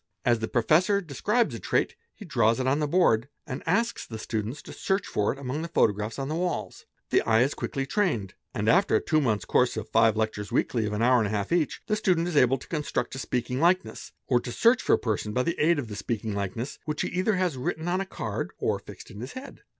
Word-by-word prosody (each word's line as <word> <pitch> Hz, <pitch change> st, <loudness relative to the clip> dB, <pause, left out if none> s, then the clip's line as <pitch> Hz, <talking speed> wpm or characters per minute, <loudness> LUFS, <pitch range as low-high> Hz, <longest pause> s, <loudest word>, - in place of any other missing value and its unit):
As 120 Hz, -2 st, +3 dB
the 110 Hz, -, -2 dB
professor 160 Hz, -, +3 dB
describes 205 Hz, -, 0 dB
a -, -, -5 dB
trait 465 Hz, -, 0 dB, 0.2 s
he 210 Hz, -, -10 dB
draws 115 Hz, -, +2 dB
it 130 Hz, -, -1 dB
on 135 Hz, +3 st, +2 dB
the 150 Hz, -, 0 dB
board, 140 Hz, -7 st, +3 dB, 0.2 s
and 130 Hz, -, -5 dB
asks 230 Hz, +7 st, +1 dB
the 110 Hz, -, -7 dB
students 110 Hz, +6 st, -4 dB
to -, -, -10 dB
search 195 Hz, +1 st, -1 dB
for 105 Hz, -, 0 dB
it -, -, -6 dB
among 140 Hz, +2 st, -4 dB
the 165 Hz, -, -3 dB
photographs 105 Hz, -8 st, +1 dB
on 135 Hz, -1 st, -3 dB
the 155 Hz, -, -2 dB
walls. 175 Hz, -1 st, -3 dB, 0.2 s
The -, -, +4 dB
eye 115 Hz, +1 st, +3 dB
is 140 Hz, -, 0 dB
quickly 135 Hz, -2 st, -3 dB
trained, 135 Hz, -, 0 dB, 0.2 s
and 110 Hz, -5 st, -3 dB
after 195 Hz, -, +4 dB
a -, -, +5 dB
two 155 Hz, -1 st, +1 dB
months' 110 Hz, -6 st, 0 dB
course 125 Hz, -2 st, +2 dB
of 110 Hz, -, -4 dB
five 115 Hz, -1 st, +4 dB
lectures 110 Hz, -2 st, -2 dB
weekly 115 Hz, -3 st, +1 dB
of -, -, -3 dB
14 105 Hz, +2 st, -1 dB
hours 110 Hz, -5 st, +2 dB
each, 170 Hz, -4 st, 0 dB
the 215 Hz, -, +1 dB
student 180 Hz, -5 st, +1 dB
is 175 Hz, -, -3 dB
able 130 Hz, -1 st, +5 dB
to -, -, -13 dB
construct 150 Hz, -3 st, -2 dB
a 130 Hz, -, -5 dB
speaking 125 Hz, 0 st, -2 dB
likeness, 180 Hz, +4 st, +1 dB
or 125 Hz, -2 st, +3 dB
to 120 Hz, -, -6 dB
search 235 Hz, -, +4 dB
for -, -, +2 dB
a -, -, +6 dB
person 105 Hz, -2 st, -2 dB
by 125 Hz, -, +1 dB
the 170 Hz, +4 st, -2 dB
aid 165 Hz, +2 st, +4 dB
of 120 Hz, -6 st, -4 dB
a -, -, -4 dB
speaking 110 Hz, +1 st, -3 dB
likeness, 100 Hz, +6 st, -4 dB
which 150 Hz, -1 st, -2 dB
he -, -, -2 dB
either 185 Hz, +4 st, +1 dB
has 180 Hz, -5 st, 0 dB
written 160 Hz, +6 st, -3 dB
on 180 Hz, +1 st, +1 dB
the 195 Hz, -, -2 dB
card -, -, -4 dB
or -, -, 0 dB
fixed -, -, -12 dB
in 100 Hz, -, -10 dB
his 125 Hz, -, -7 dB
head. 260 Hz, +2 st, -9 dB
135 Hz, 245 wpm, -27 LUFS, 110-175 Hz, 0.2 s, a